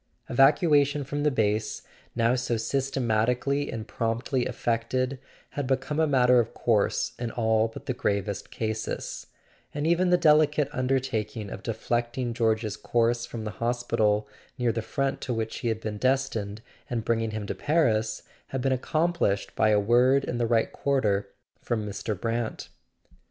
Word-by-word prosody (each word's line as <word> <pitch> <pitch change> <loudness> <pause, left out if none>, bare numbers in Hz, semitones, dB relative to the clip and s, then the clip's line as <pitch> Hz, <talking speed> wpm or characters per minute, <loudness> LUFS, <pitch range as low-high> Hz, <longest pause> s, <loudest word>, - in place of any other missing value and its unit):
Evacuation 145 +1 +4
from 145 +2 -3
the 150 - +3
base, 110 -5 0 0.3
now 115 +1 +3
so 125 -2 0
systematically 125 +2 0
and 115 -1 -5
promptly 120 +3 -1
effected, 125 +3 -1 0.3
had 145 -3 -3
become 135 +3 -1
a 160 - +3
matter 125 -3 +5
of 115 -1 -1
course 110 -4 +1
in 120 -1 -2
all 110 -1 +2
but 115 - -11
the 130 - -1
gravest 100 -4 -2
cases; 110 -1 -4 0.5
and 145 +1 -1
even 170 +2 +3
the 180 - +5
delicate 150 -3 +4
un¬ 130 0 -2
dertaking 115 -6 -1
of - - -8
deflecting 120 +2 -2
George's 110 -2 0
course 120 0 +1
from 115 -2 -6
the 105 - -4
hos¬ 120 +2 -2
pital 105 -2 +2 0.3
near 120 -2 +1
the 115 - -2
front 135 +4 -2
to 125 -3 -2
which 110 0 -3
he - - -3
had 110 -1 0
been 105 -2 -5
destined, 115 -5 0 0.3
and 115 -2 -2
bringing 115 -1 +1
him 110 -1 -4
to - - -3
Paris, 115 -9 +1 0.2
had 135 - -3
been 135 - +2
accomplished 155 - 0
by 110 - +3
a 105 -1 +4
word 125 +6 +4
in 120 - -3
the 120 - +1
right 115 -1 +2
quarter 110 -8 0 0.3
from 110 -3 -2
Mr. 105 0 -4
Brant. 115 0 -3
120 Hz, 160 wpm, -27 LUFS, 110-135 Hz, 0.5 s, matter